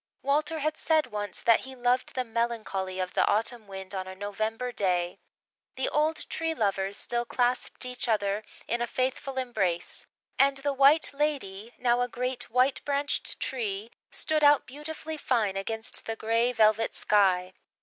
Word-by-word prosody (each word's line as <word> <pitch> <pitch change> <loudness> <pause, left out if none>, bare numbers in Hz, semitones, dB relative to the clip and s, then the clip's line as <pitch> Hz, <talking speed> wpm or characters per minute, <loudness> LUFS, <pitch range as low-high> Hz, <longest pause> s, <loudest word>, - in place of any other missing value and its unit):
Walter 300 +3 +1
had 310 +1 -1
said 315 -2 +2
once 205 -5 -2
that 230 -1 +6
he 265 0 -9
loved 245 0 0
the 255 - 0
melancholy 225 -5 -2
of 185 0 -2
the - - +3
autumn 225 +1 0
wind 190 0 -7
on 190 -1 -3
a 190 - -7
November 215 +5 -3
day. 180 -4 0 0.6
The 265 - 0
old 310 +2 0
Tree 325 0 -2
Lovers 195 -3 0
still 240 0 -1
clasped 245 +1 0
each 250 0 -3
other 205 -2 +1 0.3
in 235 0 -1
a 240 - 0
faithful 260 +1 -2
embrace, 200 -9 -1 0.3
and 275 0 +5
the 280 +1 0
White 280 +4 +5
Lady, 250 -8 -2
now 245 0 +2
a 245 - +1
great 250 0 -4
white 255 +3 +2
branched 285 0 -1
tree, 220 -3 -3 0.2
stood 310 -1 0
out 290 0 +6
beautifully 310 +3 -6
fine, 225 -9 +1
against 220 +3 -2
the 225 - -2
grey 230 +2 +1
velvet 220 -1 +3
sky. 185 -3 +3
240 Hz, 160 wpm, -28 LUFS, 205-270 Hz, 0.6 s, that